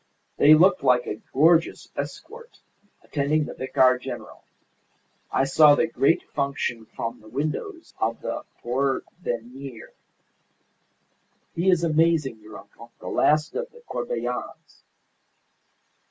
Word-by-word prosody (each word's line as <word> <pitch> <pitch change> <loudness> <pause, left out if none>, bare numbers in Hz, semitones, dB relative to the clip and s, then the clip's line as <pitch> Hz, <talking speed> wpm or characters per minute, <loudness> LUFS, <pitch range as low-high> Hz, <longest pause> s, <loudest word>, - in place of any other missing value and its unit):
They 150 +2 +7
looked 185 +3 +4
like 125 -1 +3
a 105 - -5
gorgeous 165 +4 +3
escort 470 +1 -8 0.5
attending 150 +1 0
the - - -7
Vicar 130 -1 +2
General. 125 -1 -8 0.9
I - - +2
saw 145 +2 +6
the 160 - +2
great 160 0 +1
function 135 -5 -2
from 115 +1 -6
the 110 - -16
windows 155 - -4
of 115 +1 -1
the - - -4 0.2
Porvenir. 130 -1 -4 1.6
He 175 +3 +1
is 180 -2 +3
amazing, 160 -6 +2
your 105 -1 -12
uncle, 115 +3 -15
the - - -7
last 155 +1 +2
of 485 0 -4
the 475 - -17
Corbelans. - - -5
140 Hz, 115 wpm, -24 LUFS, 125-165 Hz, 1.6 s, They